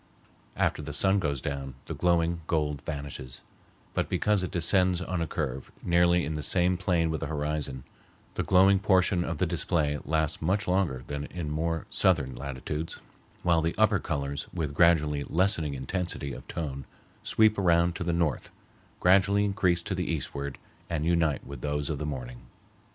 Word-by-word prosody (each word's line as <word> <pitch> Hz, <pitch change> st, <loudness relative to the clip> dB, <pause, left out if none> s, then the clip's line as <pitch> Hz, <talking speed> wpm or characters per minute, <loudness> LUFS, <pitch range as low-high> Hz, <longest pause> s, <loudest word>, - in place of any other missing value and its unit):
After -, -, 0 dB
the 75 Hz, 0 st, -6 dB
sun 95 Hz, +6 st, +3 dB
goes 70 Hz, -7 st, -1 dB
down, 70 Hz, -2 st, -4 dB
the -, -, -5 dB
glowing 85 Hz, -1 st, +1 dB
gold 75 Hz, -3 st, 0 dB
vanishes, 70 Hz, -4 st, -6 dB, 0.5 s
but -, -, -1 dB
because 105 Hz, -2 st, +2 dB
it 90 Hz, -, -2 dB
descends 90 Hz, +1 st, +2 dB
on 90 Hz, -1 st, -3 dB
a 85 Hz, -, -1 dB
curve 70 Hz, -5 st, -4 dB
nearly 85 Hz, -1 st, +3 dB
in 80 Hz, -, -3 dB
the 75 Hz, -, -3 dB
same 90 Hz, +3 st, +2 dB
plane 85 Hz, -3 st, +1 dB
with 80 Hz, -, -2 dB
the -, -, -2 dB
horizon, 75 Hz, -3 st, -2 dB, 0.5 s
the -, -, -1 dB
glowing 95 Hz, +1 st, +5 dB
portion 95 Hz, -2 st, +3 dB
of 85 Hz, -2 st, -3 dB
the 90 Hz, -, +1 dB
display 80 Hz, -3 st, 0 dB
lasts 80 Hz, -1 st, 0 dB
much 100 Hz, +6 st, 0 dB
longer 90 Hz, -9 st, 0 dB
than 70 Hz, 0 st, -4 dB
in 80 Hz, -3 st, -5 dB
more 80 Hz, +1 st, -1 dB
southern 65 Hz, -2 st, +2 dB
latitudes, 70 Hz, +4 st, -5 dB, 0.4 s
while 85 Hz, -2 st, +3 dB
the 80 Hz, +1 st, -1 dB
upper 110 Hz, -2 st, +4 dB
colors 70 Hz, -2 st, -3 dB
with 80 Hz, -5 st, -3 dB
gradually 75 Hz, -3 st, +3 dB
lessening 85 Hz, -5 st, +1 dB
intensity 70 Hz, +1 st, -3 dB
of -, -, -10 dB
tone 70 Hz, -4 st, -5 dB, 0.4 s
sweep 110 Hz, -1 st, +3 dB
around 85 Hz, -2 st, +3 dB
to 95 Hz, -, -3 dB
the 85 Hz, -, 0 dB
north, 85 Hz, -3 st, 0 dB, 0.5 s
gradually 100 Hz, +2 st, +4 dB
increase 90 Hz, -4 st, +1 dB
to 95 Hz, -, -3 dB
the 90 Hz, -2 st, -2 dB
eastward, 70 Hz, -2 st, -4 dB, 0.3 s
and 80 Hz, -2 st, -1 dB
unite 85 Hz, -4 st, +1 dB
with 70 Hz, -2 st, -8 dB
those 75 Hz, 0 st, -2 dB
of 75 Hz, -, -3 dB
the 75 Hz, -, -3 dB
morning. 60 Hz, -4 st, -6 dB
80 Hz, 170 wpm, -28 LUFS, 75-90 Hz, 0.5 s, glowing